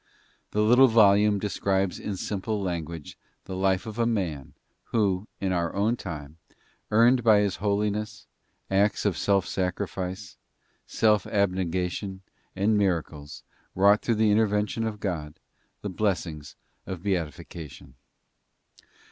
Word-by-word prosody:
The 105 - 0
little 125 +5 +6
volume 105 -2 +5
describes 95 -2 -1
in 100 -2 -4
simple 105 +3 -3
language 85 -5 -5 0.3
the 95 - -6
life 95 +1 +1
of 110 +1 -7
a 115 - +2
man, 85 - -2 0.3
who, 100 -2 0
in 95 -1 -1
our 85 -2 -1
own 105 +4 +1
time, 80 -7 -8 0.5
earned 120 +3 +4
by 110 -2 +6
his 100 -3 -1
holiness, 105 0 -2 0.5
acts 100 +2 +2
of 100 -4 +2
self 100 +2 +1
sacrifice, 95 -1 -4 0.5
self 105 -3 +2
abnegation 95 -1 -1 0.3
and 100 +3 +2
miracles, 80 -6 -2 0.3
wrought 100 +2 +5
through 115 - 0
the 110 0 +3
intervention 105 +1 +1
of 105 -2 -4
God, 80 -7 -4 0.4
the 105 - -3
blessings 85 -7 -2 0.3
of 90 -2 -6
beatification. 85 -5 -5
100 Hz, 120 wpm, -26 LUFS, 90-105 Hz, 0.5 s, little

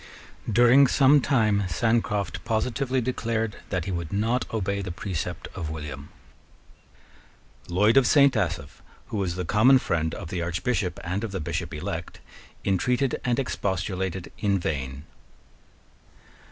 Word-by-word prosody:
During 120 +5 +6
some 140 +2 +5
time 110 -7 +2
Sancroft 105 +1 0
positively 125 +3 0
declared 115 -3 -2
that 90 -4 -2
he 95 - -3
would 85 -3 -4
not 115 +5 0
obey 100 -2 -1
the 95 -2 -5
precept 90 -2 -4
of 85 -5 -5
William. 75 -2 -7 1.6
Lloyd 105 +7 +3
of 135 -3 +6
Saint 140 -3 +5
Asaph, 85 -9 -2 0.3
who 110 - -3
was 90 -4 -1
the 90 0 -3
common 115 +9 +5
friend 80 -9 -1
of 85 - -7
the 90 -1 -3
Archbishop 90 +2 -1
and 90 +5 -2
of 110 - -3
the 95 - -3
Bishop 75 - -3
elect, - - -5 0.4
intreated 125 +7 0
and 120 -1 +1
expostulated 95 -6 -2
in 100 -2 +2
vain. 70 -5 -3
100 Hz, 135 wpm, -26 LUFS, 90-120 Hz, 1.6 s, During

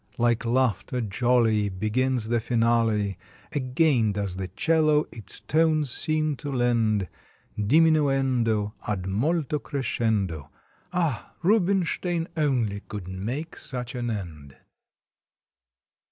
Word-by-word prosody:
Like 120 0 +1
laughter 125 0 +1
jolly 115 -1 +2
Begins 110 +4 0
the 120 0 +2
finale; 115 -4 +1 0.3
Again 130 -5 +2
does 100 -2 -2
the 95 -1 -3
'cello 155 - +2
its 110 - -7
tones 155 -3 +2
seem 155 +1 0
to 145 +1 -5
lend 115 -6 +1 0.5
Diminuendo 130 -5 +2
ad 100 -4 -2
molto 145 - 0
crescendo. 110 - -1 0.4
Ah! 165 - -2
Rubinstein 180 -3 +1
only 125 -10 0
could 100 -3 -8
make 120 - -4
such 125 -2 -4
an 120 -2 -3
end! 80 -10 -6
120 Hz, 100 wpm, -26 LUFS, 105-150 Hz, 0.5 s, jolly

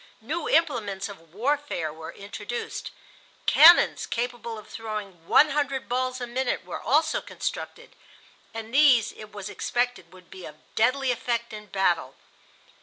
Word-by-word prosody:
New 305 +8 -3
implements 220 -12 +1
of 165 -5 -13
warfare 235 - -1
were 160 0 -8
introduced. 205 +3 -6 0.6
Cannons 340 +3 +7
capable 235 -1 -3
of 215 - -11
throwing 210 -6 -7
one 305 - +6
hundred 275 -2 -1
balls 255 +1 -1
a 245 - -3
minute 245 -5 -2
were 180 - -6
also 310 +5 +2
constructed, - - -6 0.6
and 225 +1 -8
these, 265 -6 +5
it 215 0 -12
was 205 -2 -7
expected, 245 -8 -2
would 185 -1 -17
be 190 -1 -10
of 150 - -9 0.2
deadly 255 +3 +2
effect 235 -1 -2
in 210 0 -8
battle. 175 -9 0
230 Hz, 140 wpm, -26 LUFS, 195-260 Hz, 0.6 s, Cannons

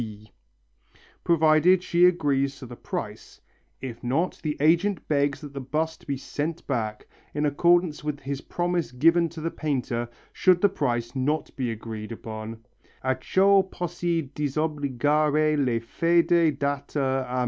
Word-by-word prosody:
_), 110 -1 -8 0.9
provided 165 +2 +4
she 175 0 +4
agrees 140 -6 +2
to 130 - -9
the 120 0 -9
price; - - -6 0.4
if 125 -3 -7
not 140 +9 0
the 150 -2 -2
agent 170 +5 +2
begs 145 -1 +1
that 145 -2 -9
the 140 - -5
bust 155 +5 -3
may 140 - -1
be - - -3
sent 155 +5 -4
back, 110 -6 -3 0.3
in 150 0 0
accordance 170 +2 +2
with 150 -1 -3
his 135 0 -4
promise 175 -3 -2
given 165 +6 +3
to 165 +1 -9
the 165 +1 -2
painter, 125 -6 -2 0.2
should 185 -2 +4
the 205 - +4
price 120 -10 -2
not 145 +4 -1
be 130 -3 -2
agreed 110 -1 -6
upon 110 0 -7 0.5
(_acciò 190 +10 +3
possi 175 -3 -2
disobbligar 150 +1 +1
la 125 -4 +1
fede 170 +1 +3
data 140 0 -1 0.2
a - - -6
M. 130 - 0
150 Hz, 150 wpm, -26 LUFS, 130-165 Hz, 0.9 s, provided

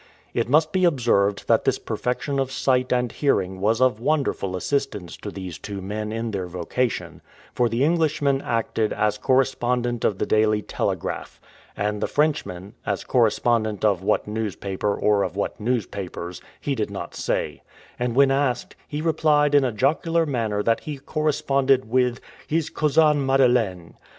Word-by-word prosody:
It - - -1
must 155 +3 +4
be 185 +2 +1
observed 115 - +2
that - - +3
this - - +2
perfection 135 +3 -2
of 135 -1 -1
sight 130 -1 +1
and 125 -2 +1
hearing 95 -10 0
was 110 +3 +2
of 130 -4 +3
wonderful 130 -9 0
assistance 95 - -2
to - - -7
these 95 -3 -7
two 100 -1 -6
men 105 +3 -4
in 115 0 -3
their 95 -3 -3
vocation, 90 +8 -3 0.3
for 120 -1 +2
the 115 +4 0
Englishman 150 -4 +2
acted 115 -2 -1
as 105 0 0
correspondent 125 -2 +1
of 100 - +1
the - - -1
Daily 110 -1 +2
Telegraph, - - -3 0.4
and 105 0 -1
the - - +1
Frenchman, 105 - -1
as 100 -2 -2
correspondent 115 -3 +1
of 100 -4 +2
what 95 - +1
newspaper, 105 -1 -2
or 105 -1 +2
of 90 -2 -2
what 100 - -3
newspapers, 100 -6 -3 0.2
he 145 - -2
did 110 -6 -2
not 100 -3 -6
say; - - -2 0.4
and 120 -1 -1
when 135 0 +5
asked, 135 -3 0
he 150 +1 -4
replied 150 -3 +3
in 145 -1 +6
a 130 - +1
jocular 160 +8 +1
manner 110 -7 -1
that 115 +1 +2
he 150 -2 -6
corresponded 140 -3 +1
with 125 +1 +1 0.3
"his 160 0 -1
cousin 150 -1 +3
Madeleine." 120 -10 +2
120 Hz, 160 wpm, -23 LUFS, 105-140 Hz, 0.4 s, in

